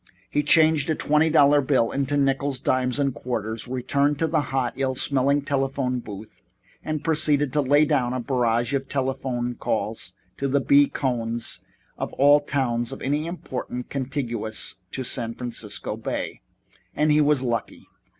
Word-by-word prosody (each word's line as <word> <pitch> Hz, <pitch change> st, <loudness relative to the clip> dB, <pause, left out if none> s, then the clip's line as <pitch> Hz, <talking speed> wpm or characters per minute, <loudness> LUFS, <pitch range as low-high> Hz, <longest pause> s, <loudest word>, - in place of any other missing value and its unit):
He 145 Hz, -, +2 dB
changed 155 Hz, 0 st, +4 dB
a 160 Hz, -, +2 dB
twenty 150 Hz, +2 st, +2 dB
dollar 145 Hz, -2 st, +5 dB
bill 130 Hz, -4 st, +2 dB
into 140 Hz, +1 st, 0 dB
nickles, 135 Hz, -1 st, +1 dB
dimes 125 Hz, 0 st, 0 dB
and 140 Hz, -2 st, +1 dB
quarters, 115 Hz, -2 st, -4 dB
returned 140 Hz, +3 st, 0 dB
to 165 Hz, -, +1 dB
the 160 Hz, -1 st, +1 dB
hot, 130 Hz, -3 st, -1 dB
ill 135 Hz, -1 st, -1 dB
smelling 140 Hz, +2 st, +1 dB
telephone 135 Hz, -2 st, -1 dB
booth 105 Hz, -2 st, -10 dB, 0.4 s
and 155 Hz, -1 st, -3 dB
proceeded 150 Hz, -3 st, +2 dB
to 150 Hz, -, +3 dB
lay 145 Hz, +3 st, +4 dB
down 125 Hz, -4 st, +1 dB
a 130 Hz, -, -2 dB
barrage 120 Hz, 0 st, 0 dB
of 135 Hz, -1 st, -2 dB
telephone 130 Hz, -2 st, -2 dB
calls -, -, -3 dB, 0.2 s
to 140 Hz, -, -1 dB
the 140 Hz, +1 st, +2 dB
B. 140 Hz, +1 st, +5 dB
Cohns 120 Hz, -3 st, -2 dB, 0.4 s
of -, -, -4 dB
all 145 Hz, +2 st, +6 dB
towns 125 Hz, -5 st, -1 dB
of -, -, -8 dB
any 145 Hz, +4 st, 0 dB
importance 125 Hz, -7 st, -5 dB
contiguous 120 Hz, -7 st, -3 dB
to 130 Hz, -, -4 dB
San 115 Hz, -2 st, -3 dB
Francisco 115 Hz, -4 st, -4 dB
Bay. -, -, -4 dB, 0.5 s
And 150 Hz, 0 st, +2 dB
he 150 Hz, +1 st, +5 dB
was 145 Hz, -3 st, +3 dB
lucky. 115 Hz, -3 st, -3 dB
135 Hz, 160 wpm, -24 LUFS, 125-145 Hz, 0.5 s, all